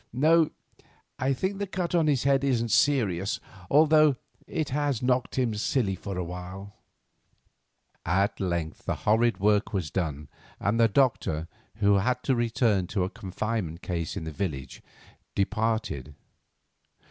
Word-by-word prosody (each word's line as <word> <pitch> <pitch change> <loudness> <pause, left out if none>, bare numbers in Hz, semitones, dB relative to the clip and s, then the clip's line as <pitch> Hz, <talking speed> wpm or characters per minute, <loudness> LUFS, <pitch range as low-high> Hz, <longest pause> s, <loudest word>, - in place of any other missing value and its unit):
No, 155 +5 +4 0.7
I 130 +1 +1
think 190 +9 -2
the 200 - -2
cut 180 -2 -3
on 165 -3 +3
his 140 -5 +2
head 140 0 +3
isn't 120 -4 +1
serious, 100 -10 +2 0.3
although 155 -1 +5 0.3
it 155 -2 -2
has 140 -3 -1
knocked 125 0 0
him 125 -4 +1
silly 105 -1 0
for 95 +1 -6
a 90 - -1
while." 90 +3 -8 1.3
At 100 +4 +1
length 85 -4 -3
the - - -1
horrid 110 -1 +3
work 105 +2 +2
was 90 -6 -2
done, 75 -6 -3 0.3
and 105 +4 0
the 115 - +6
doctor, 100 - +1 0.3
who 100 -2 +3
had 125 +5 0
to 135 - +2
return 115 -5 +1
to 95 -1 -1
a 90 - -3
confinement 95 -3 -4
case 85 -3 -3
in - - -4
the 80 - -5
village, 70 -6 -4 0.5
departed. 105 - -1
110 Hz, 145 wpm, -27 LUFS, 90-130 Hz, 1.3 s, the